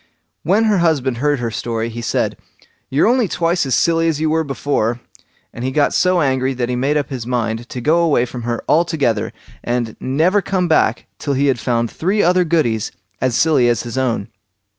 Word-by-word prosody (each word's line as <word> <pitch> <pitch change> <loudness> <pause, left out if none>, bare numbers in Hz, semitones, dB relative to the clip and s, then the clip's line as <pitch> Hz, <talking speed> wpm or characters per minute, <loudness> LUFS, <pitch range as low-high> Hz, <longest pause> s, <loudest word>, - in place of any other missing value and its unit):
When 200 +7 +2
her 210 -4 +2
husband 140 -7 +1
heard 145 +3 +1
her 120 -2 -3
story, 115 +1 -3
he 120 +1 -6
said, 115 - -1 0.5
"You're 135 +2 +2
only 245 -1 +3
twice 170 -3 0
as 130 - +2
silly 165 0 +2
as 160 -3 0
you 155 0 0
were 160 0 +1
before", 135 -5 -1 0.5
and 115 - -7
he 130 - 0
got 145 +2 +1
so 180 -1 +2
angry 130 -1 0
that 120 -1 -2
he 125 - -1
made 140 +4 +1
up 145 -1 -2
his 125 -3 -5
mind 120 -1 -2
to 125 - -5
go 155 +7 +3
away 155 -8 +2
from 125 0 -7
her 120 0 -3
altogether, 150 -10 +1 0.3
and 120 -2 -2
never 165 +10 +1
to - - -12
come 185 -2 +1
back 160 - +2
till 140 -2 -2
he 140 +2 +1
had 135 -3 +1
found 115 +1 -1
three 195 +5 0
other 180 +1 +3
Goodies 150 -11 0 0.3
as 130 -2 +1
silly 145 -7 +3
as 120 - 0
his 120 0 -6
own. 120 -5 -1
135 Hz, 205 wpm, -18 LUFS, 120-165 Hz, 0.5 s, only